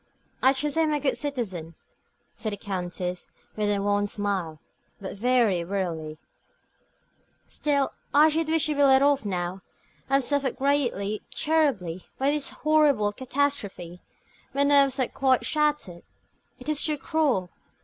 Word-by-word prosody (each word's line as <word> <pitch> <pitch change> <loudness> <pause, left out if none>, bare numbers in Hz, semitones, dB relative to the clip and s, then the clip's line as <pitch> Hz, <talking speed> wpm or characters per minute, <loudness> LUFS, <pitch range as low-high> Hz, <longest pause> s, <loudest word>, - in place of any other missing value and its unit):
"I 265 - +6
trust 295 +3 -1
I - - +5
am 310 -1 +1
a 295 - 0
good 275 -1 0
citizen," 190 - -4 0.6
said 215 -2 -4
the - - -5
Countess, 180 -3 -4 0.3
with 210 -1 0
a 205 - +1
wan 205 0 +1
smile, 195 -7 -3 0.4
but 195 -1 -7
very 225 -5 +2
wearily. 170 -5 -3 1.3
"Still, 285 -2 0 0.2
I 300 +2 +6
should 320 +1 0
wish 320 -2 +3
to 305 - 0
be 285 - 0
let 270 -1 +6
off 285 -4 +2
now. 180 -1 -3 0.5
I 270 - +3
have 275 - +3
suffered 280 -1 +1
greatly, 245 -7 0
terribly, 250 - 0
by 275 +2 +2
this 295 -1 -2
horrible 295 -9 +2
catastrophe. 220 -9 -2 0.5
My 280 - +3
nerves 280 -1 +4
are 255 - +2
quite 260 -2 +1
shattered. 295 - 0 0.6
It - - -11
is 305 -1 +3
too 305 -1 +1
cruel. 275 - 0
255 Hz, 150 wpm, -26 LUFS, 195-285 Hz, 1.3 s, I